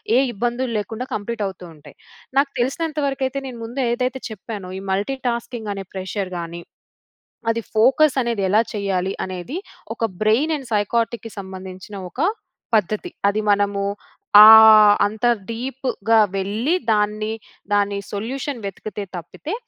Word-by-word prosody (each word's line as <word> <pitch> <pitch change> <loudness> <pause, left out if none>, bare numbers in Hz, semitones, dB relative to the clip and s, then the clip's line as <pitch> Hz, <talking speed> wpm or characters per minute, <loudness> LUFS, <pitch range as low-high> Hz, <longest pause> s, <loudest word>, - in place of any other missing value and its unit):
ఏ - - +6 0.2
ఇబ్బందులు 240 +3 -2
లేకుండా 225 +4 -4
కంప్లీట్ 215 +1 -3
అవుతూ 185 -2 -9
ఉంటాయి. 150 - -16 0.4
నాకు 275 0 +3
తెలిసినంత 305 +5 -1
వరకైతే 270 0 -2
నేను 250 -2 -8
ముందు 250 +4 -4
ఏదైతే 250 +2 -1
చెప్పానో, 205 -3 -7
ఈ - - -9
మల్టీటాస్కింగ్ 235 +1 -2
అనే 195 -1 -6
ప్రెషర్ 190 0 -4
గాని 170 0 -6 0.9
అది 230 0 -2
ఫోకస్ 265 +6 +4
అనేది 235 -3 -1
ఎలా 210 +3 +4
చేయాలి? 195 -3 -1
అనేది 185 - -6 0.4
ఒక - - -5 0.2
బ్రెయిన్ 255 +10 +3
అండ్ 265 -4 -11
సైక్ఆర్టిక్‌‌కి 225 +2 -1
సంబంధించిన 190 +1 -9
ఒక 210 - -13 0.6
పద్ధతి. 215 0 0 0.2
అది 210 +2 -1
మనము 200 0 +1 0.6
ఆ 215 - +11 0.6
అంత 215 +3 -2 0.2
డీప్‌గా 230 -2 0 0.2
వెళ్ళి 210 - -1 0.2
దాన్ని 215 0 0 0.4
దాన్ని 205 0 +2
సొల్యూషన్ 245 +5 -4
వెతికితే 205 +1 -6
తప్పితే 175 - -7
215 Hz, 130 wpm, -21 LUFS, 200-250 Hz, 0.9 s, ఆ